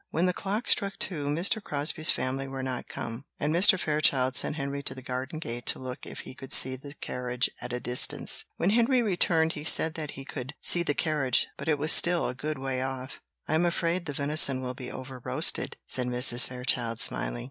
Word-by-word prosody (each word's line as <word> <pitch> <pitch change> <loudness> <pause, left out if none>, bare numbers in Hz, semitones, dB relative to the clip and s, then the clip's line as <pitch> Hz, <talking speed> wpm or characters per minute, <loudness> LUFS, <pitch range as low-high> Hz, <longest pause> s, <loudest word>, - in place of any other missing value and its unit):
When 170 +3 -1
the 180 - +1
clock 205 +6 -4
struck 200 -1 0
two, 150 -6 -4
Mr. 175 +9 +1
Crosbie's 150 -2 -2
family 135 +1 -2
were 135 -1 -6
not 130 -1 -5
come, 115 +3 -7
and 150 +2 -1
Mr. 185 +2 +6
Fairchild 140 -5 +1
sent - - +3
Henry 140 -1 -5
to 130 - -1
the 130 - -11
garden 130 +4 -5
gate 120 -6 -7
to - - +4
look 130 -1 -8
if - - -9
he - - -11
could 135 0 -12
see 130 0 +6
the 140 +2 -12
carriage 125 -2 -3
at 120 0 -7
a 125 - -3
distance. 125 0 +2
When 180 - 0
Henry 240 +2 +2
returned 170 -5 +1
he 150 - -8
said 160 0 +4
that 155 -3 -6
he 135 - -9
could 135 +1 -8
see 175 - +4
the 145 -4 -2
carriage, 150 -6 0
but - - -9
it 155 -2 +1
was 150 +2 +3
still 175 0 +6
a - - -4
good 150 +3 -5
way 130 -1 -4
off. 130 0 -6 0.3
"I - - -2
am 160 +2 +2
afraid 170 0 -1
the 145 - -4
venison 140 -2 +3
will 130 -1 -5
be 125 -1 -9
over 130 -1 -9
roasted," - - +3
said 125 -1 -2
Mrs. 125 0 +3
Fairchild, 125 -2 -2
smiling. - - 0
140 Hz, 215 wpm, -27 LUFS, 130-160 Hz, 0.3 s, Mr